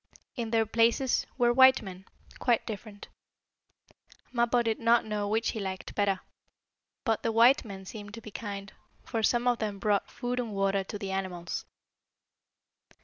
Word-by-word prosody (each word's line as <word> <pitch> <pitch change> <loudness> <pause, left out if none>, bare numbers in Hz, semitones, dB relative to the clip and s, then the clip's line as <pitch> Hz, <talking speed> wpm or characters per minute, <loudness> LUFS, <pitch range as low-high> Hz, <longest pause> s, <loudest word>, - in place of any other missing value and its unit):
In 235 -3 -3
their 225 -1 +2
places 230 +4 +2
were 240 -2 +4
white 260 +1 +7
men, 190 -1 -9 0.3
quite 240 -3 +2
different. 210 -1 -8 1.3
Mappo 240 0 +2
did 225 -1 -1
not 230 0 +4
know 210 -1 -2
which 220 +2 +1
he 220 - -3
liked 190 -2 -5
better, 200 -2 +1 0.8
but 225 -4 +1
the 230 - 0
white 235 +4 +5
men 195 -4 -9
seemed 205 +1 -8
to 230 - -9
be 215 - -10
kind, 200 -2 -6 0.3
for 225 - -2
some 240 +2 +2
of 245 -1 +2
them 210 -2 -2
brought 200 0 +1
food 245 +1 -3
and 230 -4 -3
water 195 0 +1
to 205 - -6
the 195 -1 -5
animals. 185 -3 -4
220 Hz, 160 wpm, -29 LUFS, 200-235 Hz, 1.3 s, white